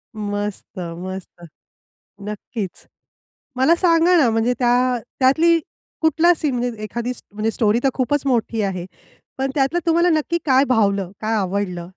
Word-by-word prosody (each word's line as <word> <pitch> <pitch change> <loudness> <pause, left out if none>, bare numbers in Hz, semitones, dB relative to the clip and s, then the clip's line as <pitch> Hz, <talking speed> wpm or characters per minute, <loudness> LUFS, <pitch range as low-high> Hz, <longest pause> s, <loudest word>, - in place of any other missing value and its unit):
मस्त, 205 -1 -4
मस्त, 175 +1 -7 0.9
नक्कीच. 210 -2 -6 0.7
मला 270 +6 +4
सांगा 345 0 +4
ना, 260 -7 +4
म्हणजे 225 +2 +1
त्या 245 +1 +2 0.2
त्यातली 325 +6 +4 0.4
कुठला 320 +2 +4
सीन 285 -5 -1
म्हणजे 240 -3 -3
एखादी 235 +3 -3 0.4
स्टोरी 220 0 +2
तर 270 - +4
खूपच 280 +2 0
मोठी 230 -3 0
आहे. 185 -3 -3 0.5
पण 265 0 -1
त्यातलं 280 +5 +1
तुम्हाला 340 +1 +3
नक्की 320 +2 +1
काय 265 -1 +4
भावलं? 200 -5 +1
काय 220 +1 0
आवडलं? 185 -3 -2
245 Hz, 130 wpm, -20 LUFS, 205-290 Hz, 0.9 s, मला